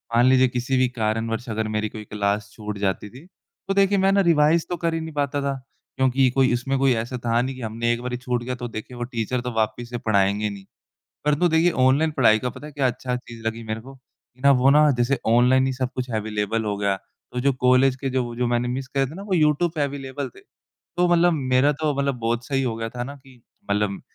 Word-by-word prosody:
मान 120 Hz, -, +5 dB
लीजिए 130 Hz, 0 st, +5 dB
किसी 125 Hz, +2 st, -1 dB
भी 130 Hz, 0 st, +3 dB
कारणवश 115 Hz, +2 st, -1 dB
अगर 110 Hz, 0 st, -2 dB
मेरी 110 Hz, 0 st, -2 dB
कोई 110 Hz, -1 st, -8 dB
क्लास 100 Hz, 0 st, -2 dB
छूट 105 Hz, -1 st, -6 dB
जाती 100 Hz, +1 st, -2 dB
थी, 130 Hz, +8 st, -14 dB, 0.4 s
तो 195 Hz, -, +1 dB
देखिए 195 Hz, 0 st, +3 dB
मैं 195 Hz, 0 st, +3 dB
ना 200 Hz, 0 st, +4 dB
रिवाइज़ 165 Hz, -1 st, +3 dB
तो 175 Hz, -, -2 dB
कर 165 Hz, 0 st, -1 dB
ही 165 Hz, -, -1 dB
नहीं 160 Hz, 0 st, -7 dB
पाता 145 Hz, -1 st, -1 dB
था 140 Hz, 0 st, -1 dB, 0.4 s
क्योंकि 130 Hz, 0 st, +3 dB
कोई 130 Hz, -2 st, +3 dB
उसमें 135 Hz, +3 st, -1 dB
कोई 135 Hz, -2 st, +4 dB
ऐसा 120 Hz, +3 st, -3 dB
था 115 Hz, 0 st, +2 dB
नहीं 130 Hz, +1 st, -3 dB
कि 130 Hz, -, -10 dB
हमने 115 Hz, +1 st, -1 dB
एक 120 Hz, -, -4 dB
बारी 125 Hz, 0 st, -3 dB
छूट 125 Hz, -1 st, -2 dB
गया, 125 Hz, +1 st, -3 dB
तो 120 Hz, 0 st, -5 dB
देखिए 115 Hz, +2 st, -8 dB
वो 120 Hz, -, -3 dB
टीचर 120 Hz, 0 st, -2 dB
तो 125 Hz, 0 st, -4 dB
वापिस 110 Hz, +2 st, -1 dB
से 120 Hz, -, -4 dB
पढ़ाएँगे 105 Hz, -1 st, +1 dB
नहीं, 100 Hz, -1 st, -9 dB, 0.6 s
परंतु 150 Hz, +4 st, +2 dB
देखिए 165 Hz, +2 st, +3 dB
ऑनलाइन 135 Hz, +3 st, +3 dB
पढ़ाई 115 Hz, -6 st, +4 dB
का 125 Hz, +3 st, -3 dB
पता 145 Hz, -, -10 dB
है 150 Hz, -, -10 dB
क्या 140 Hz, -2 st, +1 dB
अच्छी 125 Hz, 0 st, -2 dB
चीज़ 120 Hz, -2 st, -11 dB
लगी 115 Hz, +1 st, -2 dB
मेरे 110 Hz, 0 st, -4 dB
को, 135 Hz, +3 st, -12 dB
कि 130 Hz, -1 st, -28 dB
ना, 140 Hz, -, +5 dB
वो 135 Hz, 0 st, +5 dB
ना, 150 Hz, 0 st, +6 dB
जैसे 120 Hz, +2 st, +1 dB
ऑनलाइन 125 Hz, +3 st, +4 dB
ही 135 Hz, -, 0 dB
सब 130 Hz, -1 st, -2 dB
कुछ 130 Hz, 0 st, -4 dB
अवेलेबल 110 Hz, +1 st, -1 dB
हो 105 Hz, -1 st, -1 dB
गया 100 Hz, -1 st, 0 dB
है, 95 Hz, -, -3 dB, 0.3 s
तो 125 Hz, -, -2 dB
जो 140 Hz, +1 st, +2 dB
कॉलेज 130 Hz, +1 st, +3 dB
के 135 Hz, 0 st, -3 dB
जो 130 Hz, -1 st, 0 dB
वो 120 Hz, 0 st, -6 dB
जो 125 Hz, 0 st, 0 dB
मैंने 120 Hz, 0 st, 0 dB
मिस 130 Hz, +1 st, -3 dB
करे 135 Hz, 0 st, 0 dB
थे 150 Hz, -, -10 dB
ना, 195 Hz, -, -7 dB
वो 200 Hz, -2 st, -2 dB
यूट्यूब 155 Hz, +1 st, +3 dB
पे 155 Hz, -, -3 dB
अवेलेबल 140 Hz, -1 st, -4 dB
थे, -, -, -13 dB
तो 175 Hz, 0 st, -5 dB
मतलब 175 Hz, 0 st, +4 dB
मेरा 135 Hz, -1 st, +2 dB
तो 150 Hz, 0 st, -1 dB
मतलब 140 Hz, -3 st, 0 dB
बहुत 115 Hz, +1 st, -1 dB
सही 135 Hz, -1 st, 0 dB
हो 120 Hz, -3 st, -1 dB
गया 115 Hz, 0 st, -3 dB
था 120 Hz, +1 st, -5 dB
ना 140 Hz, +3 st, -7 dB
कि 130 Hz, -3 st, -19 dB, 0.3 s
मतलब 100 Hz, -1 st, 0 dB
125 Hz, 250 wpm, -23 LUFS, 115-140 Hz, 0.6 s, ना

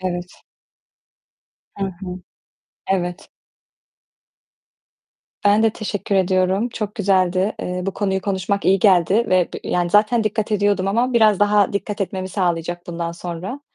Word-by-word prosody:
Evet. 180 Hz, -1 st, -5 dB, 1.4 s
Hı 195 Hz, -, -1 dB
hı. 195 Hz, -, -3 dB, 1.0 s
Evet. 180 Hz, -2 st, -3 dB, 2.2 s
Ben 205 Hz, +2 st, +4 dB
de 225 Hz, -, +4 dB
teşekkür 205 Hz, -2 st, -4 dB
ediyorum. 190 Hz, +3 st, +2 dB
Çok 215 Hz, -3 st, -5 dB
güzeldi. 190 Hz, -1 st, +1 dB
Eee, 180 Hz, 0 st, -3 dB
bu 195 Hz, -, -1 dB
konuyu 190 Hz, -2 st, -1 dB
konuşmak 200 Hz, +1 st, -2 dB
iyi 195 Hz, +1 st, +4 dB
geldi 185 Hz, -2 st, +4 dB
ve 185 Hz, -2 st, +3 dB
b -, -, -4 dB
yani, 175 Hz, -1 st, 0 dB
zaten 215 Hz, +3 st, +3 dB
dikkat 215 Hz, 0 st, -1 dB
ediyordum 200 Hz, -2 st, +1 dB
ama 240 Hz, +5 st, +1 dB
biraz 215 Hz, -4 st, +4 dB
daha 205 Hz, -1 st, +3 dB
dikkat 205 Hz, +1 st, -3 dB
etmemi 190 Hz, -1 st, -3 dB
sağlayacak 175 Hz, -2 st, -2 dB
bundan 170 Hz, -1 st, -4 dB
sonra, 180 Hz, +9 st, -6 dB
195 Hz, 130 wpm, -20 LUFS, 180-210 Hz, 2.2 s, Ben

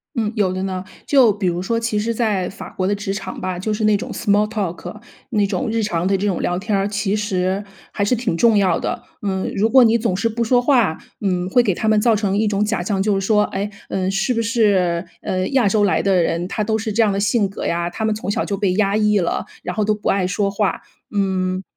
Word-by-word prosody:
嗯， 220 Hz, -4 st, 0 dB
有 195 Hz, -3 st, +1 dB
的 185 Hz, 0 st, -3 dB
呢。 185 Hz, -1 st, -3 dB, 0.2 s
就 260 Hz, -6 st, +5 dB
比 200 Hz, -2 st, -3 dB
如 175 Hz, 0 st, -1 dB
说 230 Hz, +4 st, -1 dB
其 225 Hz, -2 st, -1 dB
实 230 Hz, +2 st, -1 dB
在 210 Hz, -6 st, 0 dB
法 -, -, -9 dB
国 185 Hz, -, -2 dB
的 205 Hz, -, +1 dB
职 200 Hz, -1 st, -3 dB
场 200 Hz, -, -6 dB
吧， 185 Hz, -1 st, -3 dB
就 215 Hz, +3 st, -2 dB
是 215 Hz, +1 st, -2 dB
那 215 Hz, -1 st, +4 dB
种 -, -, -6 dB
small 205 Hz, +1 st, +2 dB
talk， 210 Hz, 0 st, -4 dB, 0.3 s
那 210 Hz, -4 st, +2 dB
种 195 Hz, +2 st, -2 dB
日 225 Hz, 0 st, 0 dB
常 175 Hz, -4 st, -1 dB
的 195 Hz, +1 st, +2 dB
这 200 Hz, -, -1 dB
种 190 Hz, -4 st, -1 dB
聊 175 Hz, 0 st, 0 dB
天 210 Hz, +1 st, -1 dB
儿， 195 Hz, 0 st, +1 dB
其 205 Hz, 0 st, -1 dB
实 195 Hz, -1 st, -1 dB, 0.3 s
还 200 Hz, -, -1 dB
是 205 Hz, -, +2 dB
挺 220 Hz, -8 st, -1 dB
重 225 Hz, +1 st, +4 dB
要 190 Hz, -2 st, +2 dB
的。 -, -, -3 dB, 0.2 s
嗯， 190 Hz, -2 st, -2 dB
如 220 Hz, +3 st, +2 dB
果 260 Hz, -2 st, +7 dB
你 225 Hz, +1 st, +4 dB
总 230 Hz, -5 st, 0 dB
是 200 Hz, +5 st, 0 dB
不 230 Hz, +1 st, -2 dB
说 245 Hz, +2 st, +3 dB
话， 240 Hz, -, +2 dB, 0.2 s
嗯， 180 Hz, -2 st, 0 dB
会 245 Hz, +5 st, +4 dB
给 205 Hz, -5 st, +1 dB
他 220 Hz, -, -2 dB
们 215 Hz, -1 st, +4 dB
造 230 Hz, +1 st, +3 dB
成 200 Hz, -2 st, 0 dB
一 215 Hz, +1 st, +2 dB
种 205 Hz, 0 st, 0 dB
假 210 Hz, -3 st, 0 dB
象， 195 Hz, +1 st, -1 dB
就 200 Hz, -1 st, +1 dB
是 195 Hz, -, -2 dB
说： 210 Hz, -1 st, +3 dB
哎？ 200 Hz, +1 st, -3 dB, 0.2 s
嗯 190 Hz, 0 st, -1 dB
是 195 Hz, +6 st, 0 dB
不 230 Hz, -, 0 dB
是， 195 Hz, -6 st, +1 dB, 0.2 s
嗯， 185 Hz, 0 st, -2 dB
亚 255 Hz, -5 st, +4 dB
洲 205 Hz, +1 st, +2 dB
来 180 Hz, -5 st, +2 dB
的 190 Hz, -3 st, +3 dB
人， 170 Hz, +2 st, -1 dB
他 215 Hz, -, -2 dB
都 220 Hz, +1 st, 0 dB
是 220 Hz, 0 st, -3 dB
这 225 Hz, +3 st, +3 dB
样 215 Hz, -, +3 dB
的 195 Hz, -, -2 dB
性 205 Hz, 0 st, +2 dB
格 195 Hz, -, -7 dB
呀？ 170 Hz, 0 st, -1 dB
他 220 Hz, +5 st, -5 dB
们 220 Hz, 0 st, +1 dB
从 210 Hz, -2 st, -4 dB
小 -, -, 0 dB
就 200 Hz, -, -2 dB
被 195 Hz, -2 st, +1 dB
压 200 Hz, 0 st, +2 dB
抑 210 Hz, -1 st, +3 dB
了， 170 Hz, -3 st, -1 dB, 0.2 s
然 -, -, -4 dB
后 215 Hz, -, 0 dB
都 215 Hz, -, +2 dB
不 210 Hz, -, -4 dB
爱 195 Hz, -2 st, +2 dB
说 195 Hz, +2 st, 0 dB
话， 200 Hz, 0 st, -1 dB, 0.3 s
嗯， 190 Hz, -2 st, -1 dB
205 Hz, 300 characters per minute, -20 LUFS, 190-215 Hz, 0.3 s, 果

